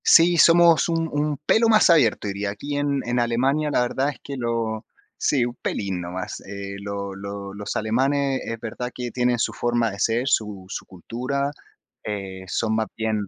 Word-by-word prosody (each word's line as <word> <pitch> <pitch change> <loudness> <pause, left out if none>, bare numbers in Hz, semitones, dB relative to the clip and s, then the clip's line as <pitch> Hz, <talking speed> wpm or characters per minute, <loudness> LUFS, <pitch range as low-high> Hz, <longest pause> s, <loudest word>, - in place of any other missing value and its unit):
Sí, 170 +1 +6
somos 170 -1 +6
un 165 -1 0
un 145 0 0
pelo 230 +1 +4
más 215 -3 +6
abierto, 120 -10 +3
diría 100 +1 -2
aquí 140 +8 -5
en 145 -1 0
en 120 +1 0
Alemania. 130 +6 +1
La 125 - +3
verdad 130 +3 0
es 145 - -6
que 140 - -6
lo 115 -3 -2 0.3
sí, 130 -5 +2
un 120 - -4
pelín 95 -3 -2
nomás. 90 +1 -5
Eh, 100 0 -7
lo 100 -1 -4
lo 100 0 -6
los 105 0 -5
alemanes 135 +5 +1
es 115 0 -5
verdad 125 +3 -5
que 125 -1 -4
tienen 125 -1 +1
su - - 0
forma 120 -2 0
de 100 - -9
ser, 115 +5 +1
su 105 -6 0
su - - -5
cultura, 130 +9 -3 0.5
eh, 95 -3 -5
son 110 +4 0
más 110 -1 0
bien 110 -2 -1
120 Hz, 185 wpm, -23 LUFS, 100-140 Hz, 0.5 s, Sí